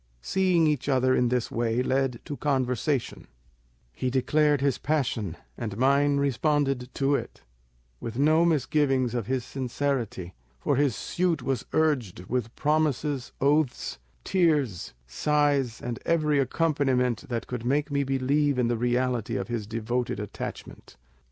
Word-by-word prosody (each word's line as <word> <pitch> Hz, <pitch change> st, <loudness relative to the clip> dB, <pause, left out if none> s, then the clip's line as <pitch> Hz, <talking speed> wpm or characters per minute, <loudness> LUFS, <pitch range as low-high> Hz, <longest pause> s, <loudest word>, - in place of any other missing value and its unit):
"Seeing 185 Hz, -, +2 dB
each 145 Hz, -2 st, 0 dB
other 130 Hz, -1 st, +3 dB
in 125 Hz, -1 st, +2 dB
this 125 Hz, -1 st, -1 dB
way 115 Hz, +1 st, 0 dB
led 130 Hz, -2 st, 0 dB
to 145 Hz, -, -5 dB
conversation; 130 Hz, -1 st, -1 dB, 0.7 s
he 130 Hz, -, -2 dB
declared 145 Hz, +3 st, +2 dB
his 140 Hz, -1 st, 0 dB
passion, 120 Hz, -, -1 dB, 0.2 s
and 110 Hz, -4 st, -5 dB
mine 140 Hz, +3 st, +3 dB
responded 140 Hz, -2 st, +1 dB
to 140 Hz, +1 st, +1 dB
it, -, -, -3 dB, 0.6 s
with 115 Hz, 0 st, -6 dB
no 155 Hz, +4 st, +4 dB
misgiving 135 Hz, -5 st, +2 dB
of 120 Hz, -4 st, -2 dB
his 130 Hz, -2 st, -1 dB
sincerity, 125 Hz, -8 st, -3 dB, 0.3 s
for 145 Hz, -, +1 dB
his 140 Hz, -4 st, +2 dB
suit 175 Hz, -2 st, -1 dB
was 130 Hz, -4 st, -2 dB
urged 135 Hz, -, +1 dB
with 120 Hz, +1 st, -3 dB
promises, 150 Hz, -3 st, 0 dB
oaths, 140 Hz, -, +1 dB, 0.2 s
tears, 150 Hz, -, +1 dB
sighs, 140 Hz, -, +1 dB
and 120 Hz, -1 st, -5 dB
every 155 Hz, -3 st, +2 dB
accompaniment 130 Hz, -4 st, +1 dB
that 120 Hz, -2 st, -2 dB
could 125 Hz, -2 st, -5 dB
make 145 Hz, +4 st, 0 dB
me 140 Hz, 0 st, +1 dB
believe 135 Hz, +1 st, +1 dB
in 120 Hz, -2 st, +2 dB
the 120 Hz, -, 0 dB
reality 125 Hz, -1 st, 0 dB
of 95 Hz, -1 st, -3 dB
his 115 Hz, -4 st, -3 dB
devoted 115 Hz, +1 st, -2 dB
attachment. 100 Hz, -9 st, -7 dB
130 Hz, 140 wpm, -27 LUFS, 120-145 Hz, 0.7 s, no